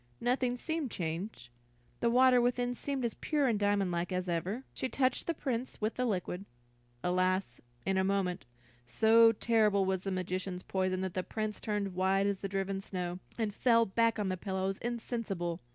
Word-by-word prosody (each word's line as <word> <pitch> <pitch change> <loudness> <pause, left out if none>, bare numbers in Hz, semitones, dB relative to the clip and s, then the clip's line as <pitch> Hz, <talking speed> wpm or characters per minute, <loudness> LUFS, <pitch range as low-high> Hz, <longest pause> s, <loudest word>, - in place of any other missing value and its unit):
Nothing 245 0 +1
seemed 315 0 -2
changed; 170 - -4 0.5
the 235 - +2
water 250 +1 +6
within 245 0 +1
seemed 270 0 -3
as 230 - -1
pure 295 -3 0
and 225 -4 +1
diamond 205 -2 +2
like 175 +1 -2
as 185 0 -1
ever. 180 +8 -2
She 260 - -2
touched 255 -1 0
the 335 - 0
Prince 255 -4 -3
with 215 +1 0
the 250 - -1
liquid. 185 -2 -2 0.6
Alas, 185 +1 0 0.2
in 190 0 +2
a - - +3
moment, 190 -6 0 0.4
so 225 - +6
terrible 215 -3 +3
was 190 -1 0
the 195 - -3
magician's 185 0 -3
poison 185 -1 -1
that 190 -2 -3
the 185 - 0
Prince 215 +2 -4
turned 205 -3 -2
white 190 +2 +2
as 200 -1 0
the 195 - -4
driven 195 0 -2
snow, 180 -2 -4 0.2
and 220 -3 -1
fell 230 0 +4
back 230 +3 +2
on 205 -3 -1
the 185 - -1
pillows 190 0 -2
insensible. 225 -8 -3
200 Hz, 180 wpm, -32 LUFS, 185-235 Hz, 0.6 s, water